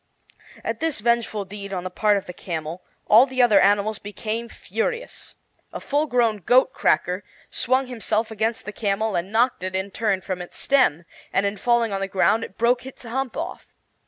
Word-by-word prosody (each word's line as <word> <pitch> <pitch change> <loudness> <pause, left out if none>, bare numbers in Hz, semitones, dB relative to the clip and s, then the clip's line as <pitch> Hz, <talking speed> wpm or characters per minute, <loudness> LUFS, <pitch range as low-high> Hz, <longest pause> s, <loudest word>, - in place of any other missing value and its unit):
At - - -3
this 320 -5 -1
vengeful 225 -2 0
deed 200 0 -8
on 180 -2 -3
the 185 - -5
part 210 +2 +3
of 195 - -5
the 180 - -8
camel 165 0 -5 0.2
all 230 +5 +7
the 260 -1 +2
other 215 -5 +6
animals 205 +1 +3
became 215 +3 -4
furious. 225 - -4 0.4
A - - -5
full 295 +2 0
grown 235 -5 +2
goat 250 +7 +3
cracker 180 +3 +1 0.3
swung 260 +2 +1
himself 225 -2 -1
against 220 +1 -1
the 210 - -5
camel 210 0 -1
and 175 +3 -2
knocked 235 +1 +2
it, 185 0 -4
in 190 +1 -2
turn, 200 -3 0
from 185 -1 -4
its 175 - -9
stem; 245 - +2 0.3
and 195 - +1
in 200 +1 0
falling 235 0 +1
on 195 - -2
the 195 - -1
ground 210 +3 +2
it 190 - -9
broke 240 +2 +2
its 265 0 -10
hump 250 +2 -3
off. - - -5
215 Hz, 190 wpm, -23 LUFS, 195-240 Hz, 0.4 s, all